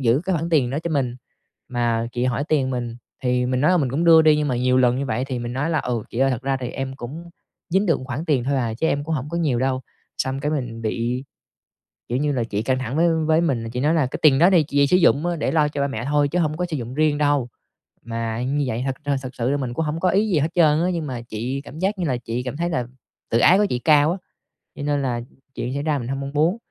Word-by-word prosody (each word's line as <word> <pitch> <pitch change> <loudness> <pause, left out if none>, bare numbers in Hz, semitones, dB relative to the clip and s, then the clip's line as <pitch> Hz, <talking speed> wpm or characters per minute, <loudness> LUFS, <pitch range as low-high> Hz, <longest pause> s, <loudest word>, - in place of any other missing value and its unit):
giữ 125 +2 +3
cái 190 -1 0
khoản 165 +2 -2
tiền 135 -7 +3
đó 140 - -1
cho 170 - -3
mình. 130 -5 -1 0.5
Mà 115 -2 0
chị 120 - -1
hỏi 130 +2 0
tiền 140 -4 +1
mình, 120 -2 -3 0.3
thì 125 -1 +1
mình 130 0 0
nói 150 - +4
là 180 - +4
mình 135 -7 +1
cũng 155 +6 0
đưa 165 -1 +7
đi 155 -1 +5
nhưng 150 -1 0
mà 125 - 0
nhiều 125 +1 +2
lần 125 -1 +3
như 140 +1 -2
vậy 120 +3 -1
thì 130 -3 -3
mình 120 0 -4
nói 145 +6 -1
là 155 - +1
"Ừ, 120 -3 -2
chị 115 - -5
ơi, 135 0 +3
thật 125 -1 -2
ra 135 0 0
thì 125 -2 -4
em 135 0 -5
cũng 155 +8 -8 0.4
dính 195 +4 +2
được 165 -5 +2
một 130 - -8
khoản 140 +4 -4
tiền 145 -8 +1
thôi 140 +2 0
à, 115 -3 -1
chứ 145 +8 -1
em 145 -2 0
cũng 160 - -2
hổng 145 0 -3
có 170 - -2
nhiều 145 -8 +1
đâu." 130 +1 0 0.4
Xong 130 +1 -1
cái 150 - -1
mình 120 -6 -4
bị, 120 +4 -2 0.9
kiểu 125 - 0
như 145 0 +1
là, 125 -4 0
chị 105 -2 -2
căng 130 +2 0
thẳng 130 +2 -4
với 170 +1 +4 0.2
với 160 +1 +4
mình, 125 -9 -1
chị 125 - -3
nói 150 +4 +2
là 160 -4 +2
"Cái - - -6
tiền 140 -3 +5
đó 175 +3 +6
thì 170 -4 +5
chị 140 -1 +2
sử 180 - +4
dụng 160 -3 +3
á 175 -1 0
để 145 -4 -1
lo 150 -2 +3
cho 145 -1 -3
ba 140 - +1
mẹ 115 -3 -4
thôi, 145 +1 +2
chứ 180 - 0
hông 155 -2 0
có 180 - 0
sử 155 - -1
dụng 120 0 -6
riêng 150 0 +2
đâu." 145 -4 +1 0.5
Mà 115 +1 -3
như 145 +3 0
vậy 120 0 -2
thật 135 - -1
thật 145 -1 +1
thật 130 -1 -8
sự 130 +4 0
mình 125 -3 -3
cũng 160 +4 -1
hông 150 +2 -2
có 185 +1 +2
ý 210 +4 +2
gì 170 - +2
hết 150 +3 +1
trơn 155 -2 +4
á, 180 - +1
nhưng 165 -2 -2
mà 125 -3 -4
chị 120 +4 -4
cảm 145 +2 -11
giác 195 +2 0
như 175 - 0
là 125 - 0
chị 120 +1 -4
cảm 130 +3 -5
thấy 170 +1 -1
là 125 -8 -2 0.4
tự 115 - +2
ái 180 +9 +6
của 210 - +3
chị 125 - -1
cao 150 +2 +4
á. 180 - -2 0.6
Cho - - -6
nên 145 -1 0
là, 120 -3 -1 0.3
chuyện 125 - -3
xảy 140 - -2
ra 150 -2 0
mình 120 - -5
hông 135 +1 -3
mong 140 +1 -5
muốn, 160 +7 +2
135 Hz, 295 wpm, -22 LUFS, 125-155 Hz, 0.9 s, đưa